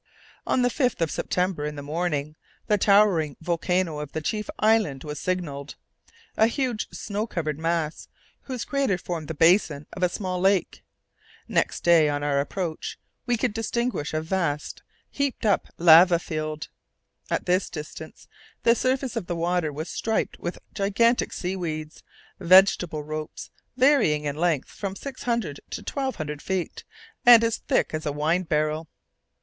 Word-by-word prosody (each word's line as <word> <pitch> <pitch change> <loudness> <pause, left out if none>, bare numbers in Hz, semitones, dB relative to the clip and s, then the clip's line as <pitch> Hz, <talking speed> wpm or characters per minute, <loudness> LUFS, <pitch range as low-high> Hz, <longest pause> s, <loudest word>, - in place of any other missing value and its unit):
On 255 - +2
the 245 - +3
5th 250 -1 0
of 165 -2 0
September, 180 -4 -1
in 150 0 -3
the 145 - -7
morning, 155 -1 -2 0.3
the 210 -1 +2
towering 195 -8 +4
volcano 170 -1 -1
of 150 -1 -7
the 160 - -2
chief 210 +4 -3
island 215 -11 +2
was 150 -2 -6
signalled; 155 -6 -3 0.6
a 220 - +4
huge 245 -3 -2
snow 210 +1 -4
covered 155 -7 -3
mass, 165 -1 -2 0.4
whose 255 -3 -4
crater 275 -9 0
formed 170 -3 -5
the 160 - -5
basin 165 -3 +3
of 185 - -7
a 180 - +3
small 185 -1 -3
lake. 190 -1 +1 0.7
Next - - 0
day, 165 -3 +5
on 145 0 -2
our 145 -1 +1
approach, 160 +3 -3 0.3
we 240 -1 +2
could 230 -1 0
distinguish 225 -6 -2
a 155 - -1
vast 160 -4 -2 0.3
heaped 280 -5 -2
up 205 - +2
lava 170 +1 +7
field. 155 -2 -5 0.6
At - - -1
this 180 +2 +1
distance 150 -2 -9 0.4
the 230 - +6
surface 255 +1 -1
of 175 - -3
the 175 - -2
water 170 -1 0
was 155 +4 -5
striped 225 -1 -2
with 175 - -4 0.2
gigantic 220 +4 +2
seaweeds, 165 -4 -4 0.4
vegetable 180 -4 +4
ropes, 155 0 -6 0.3
varying 255 - +4
in 145 -1 -2
length 160 -3 0
from 195 -2 -5
six 270 +4 -8
hundred 230 - -2
to - - -6
twelve 270 -2 -2
hundred 150 -2 -5
feet, 190 -3 -3 0.4
and 240 -1 +9
as 230 -1 +1
thick - - 0
as 155 0 -3
a - - 0
wine 155 +5 +1
barrel. 155 -1 -1
175 Hz, 155 wpm, -25 LUFS, 155-210 Hz, 0.7 s, and